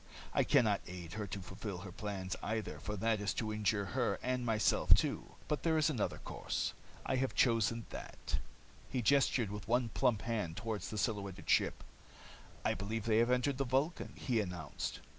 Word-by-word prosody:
I - - +4
can - - +5
not 105 -2 +2
aid 90 -2 -7
her 105 -2 -3
to 100 +2 -4
fulfill 95 +1 -5
her 95 - -7
plans, 95 -2 -4
either, 110 -1 -2
for 105 - -4
that 110 +1 +1
is 100 -1 0
to 110 -2 -1
injure 105 -1 +1
her 125 -2 +1
and 125 0 0
myself 110 -3 +5
too. - - -1
But 150 - 0
there 160 -1 +2
is 155 0 +3
another 120 -8 -1
course. - - -3 0.3
I 130 - +1
have 130 0 0
chosen 115 -2 +3
that." - - -4 0.5
He 125 -2 -1
gestured 125 -3 +3
with 105 -1 -6
one 120 +1 +2
plump 110 0 +2
hand 105 -8 -2
toward 110 -2 -2
the 105 - -5
silhouetted 100 -4 -2
ship. - - +3 0.8
"I - - +3
believe 105 +3 -3
they 110 -1 +4
have 120 +1 +4
entered 125 +2 +2
the - - +3
Vulcan," 135 +7 0
he 120 -4 0
announced. 90 -8 -4
110 Hz, 185 wpm, -35 LUFS, 100-125 Hz, 0.8 s, can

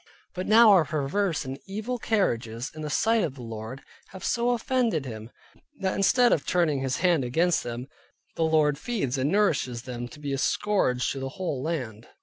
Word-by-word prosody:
But 185 0 -4
now 220 +1 +7
our 185 -5 +6
perverse 155 +3 -1
and 135 +1 -6
evil 220 +5 -4
carriages 120 - -1
in 155 - -8
the 150 - -4
sight 225 +7 +2
of 150 -6 -3
the 125 - -9
Lord, 115 +3 -7 0.2
have 190 - -9
so 240 0 +1
offended 235 - 0
Him, 110 -2 -7 0.5
that 190 -1 0
instead 240 +5 +4
of 145 - 0
turning 165 -6 +1
His 130 -1 -1
hand 175 -6 +2
against 165 +8 +1
them, 120 +1 -5 0.5
the - - -4
Lord 155 -3 +2
feeds 190 - -2
and 140 +4 +1
nourishes 140 - +1
them 120 -2 -5
up - - -9
to 150 - -13
be 145 -2 -3
a 135 - -1
scourge 135 -10 +1
to 135 - -4
the 135 0 -4
whole 170 -8 -2
land. 125 -8 -4
155 Hz, 195 wpm, -26 LUFS, 130-195 Hz, 0.5 s, now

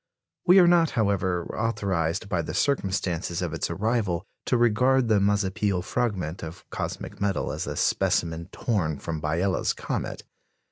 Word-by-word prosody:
We 180 +2 +8
are 185 - +8
not, 170 -2 +5
however, 95 -5 +1
authorised 100 -5 -1
by 90 -3 0
the 80 +1 -5
circumstances 95 - 0
of 85 -2 -3
its 80 - -2
arrival 100 -1 0 0.2
to 125 - +3
regard 120 +2 +3
the 105 -2 +4
Mazapil 100 -1 +1
fragment 95 -8 -2
of 80 +3 -9
cosmic - - -5
metal 100 -1 0
as - - -4
a - - -3
specimen 85 +1 0
torn 85 - -1
from 80 0 -5
Biela's 85 +5 0
comet. - - -4
95 Hz, 145 wpm, -26 LUFS, 85-115 Hz, 0.2 s, We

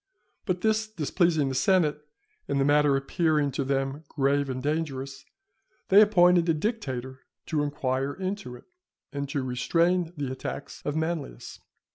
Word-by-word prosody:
But 180 -2 -1
this 220 0 +1
displeasing 165 -5 +1
the - - -3
senate, 150 0 +2 0.4
and 140 - 0
the 135 - +2
matter 145 -1 +4
appearing 150 +1 +1
to 140 +1 -2
them 135 +2 -2
grave 140 0 +1
and 130 0 -3
dangerous, 140 -3 -3 0.6
they 200 +2 +8
appointed 180 -4 +5
a 165 - +3
dictator 130 - -3 0.3
to 155 -3 -1
inquire 140 -1 -1
into 190 -8 -4
it, - - -14 0.5
and 140 -1 -4
to 140 -1 -2
restrain 170 +7 +1
the 140 -3 -3
attacks 130 +1 -6
of 145 - -2
Manlius. 160 - -4
150 Hz, 145 wpm, -27 LUFS, 135-175 Hz, 0.6 s, they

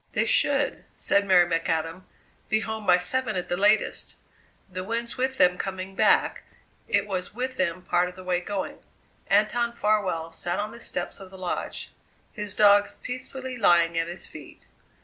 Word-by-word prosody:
"They - - +1
should," - - +1
said 200 0 +1
Mary 180 -2 +6
McAdam, 165 +1 -2 0.4
"be 215 0 +2
home 220 -1 -5
by 180 -1 +7
seven 215 +5 -1
at 180 - -3
the 175 - +1
latest. 205 +3 +1 0.5
The 185 -1 -6
wind's 230 +3 -3
with 265 +1 -1
them 180 -3 +4
coming 190 0 -4
back; - - +3 0.5
it - - +2
was 190 -1 -4
with 255 +1 -3
them 180 0 -1
part 180 0 +1
of 180 - -13
the 185 - -10
way 180 -1 0
going!" 195 +1 -4 0.5
Anton 225 +4 +2
Farwell 195 -8 0
sat 175 +2 -3
on 210 +1 -3
the 235 - -11
steps 180 -4 -3
of 195 -1 -11
the 190 - -12
Lodge, 185 -1 -4 0.4
his 210 -2 -1
dogs 205 -1 +5
peacefully 255 0 -5
lying 170 -4 +4
at 165 0 0
his 175 +2 -7
feet. - - -12
195 Hz, 170 wpm, -26 LUFS, 180-215 Hz, 0.5 s, by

